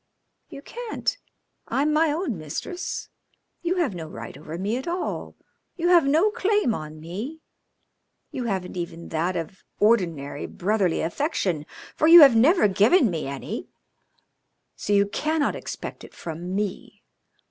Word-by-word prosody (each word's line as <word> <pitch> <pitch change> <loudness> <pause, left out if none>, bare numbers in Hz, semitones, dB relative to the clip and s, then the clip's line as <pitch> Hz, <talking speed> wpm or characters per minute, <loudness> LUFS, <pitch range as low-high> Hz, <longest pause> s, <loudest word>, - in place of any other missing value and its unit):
"You 275 - -10
can't. 480 +4 -3 0.5
I'm 295 +2 +1
my 310 0 +3
own 300 - -2
mistress. 160 - -5 0.5
You 355 +1 0
have 335 - 0
no 165 -3 -6
right 115 -6 -8
over 155 +3 -7
me 200 +5 -1
at 265 - -6
all. 350 +1 -3 0.4
You 345 0 0
have 340 -5 +6
no 325 +9 +4
claim 415 - +1
on 155 -3 -6
me. 210 - -6 0.9
You 250 - -4
haven't 190 -5 -3
even 170 -1 -6
that 170 +3 -1
of 170 +3 -5 0.2
ordinary 170 -10 +1
brotherly 195 -2 0
affection, 175 - -1 0.3
for 310 - +2
you 335 +1 +11
have 275 -5 +9
never 285 - +5
given 215 - +4
me 160 -4 -3
any, 140 -1 -5 1.1
so - - -4
you 200 0 +5
cannot 305 +7 0
expect - - -7
it - - -13
from 175 +3 -5
me. 205 -2 -4
210 Hz, 145 wpm, -25 LUFS, -, 1.1 s, you